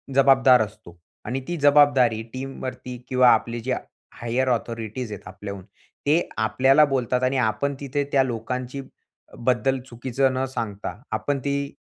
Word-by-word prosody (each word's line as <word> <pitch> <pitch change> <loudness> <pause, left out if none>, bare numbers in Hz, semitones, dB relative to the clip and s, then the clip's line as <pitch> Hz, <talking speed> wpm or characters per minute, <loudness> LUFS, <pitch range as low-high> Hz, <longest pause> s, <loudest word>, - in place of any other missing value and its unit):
जबाबदार 130 -2 +6
असतो 105 -5 -7 0.3
आणि 130 +2 -2
ती 175 - -2
जबाबदारी 140 -6 +4
टीमवरती 130 -1 -6
किंवा 125 -1 +5
आपले 120 0 +1
जे 130 - 0 0.5
हायर 120 +3 0
ऑथॉरिटीज 115 -1 -3
आहेत 100 -3 -8
आपल्याहून 100 0 -8 0.4
ते 150 +4 +4 0.3
आपल्याला 135 +6 +4
बोलतात 130 -2 -1
आणि 130 +1 +1
आपण 130 +4 0
तिथे 145 +1 -2
त्या 135 -1 +5
लोकांचीबद्दल 130 +1 -3
चुकीचं 130 +2 0
न 130 +1 -1
सांगता, 110 -4 -5
आपण 145 -1 -1
ती 140 +1 -2
130 Hz, 130 wpm, -24 LUFS, 115-135 Hz, 0.5 s, जबाबदार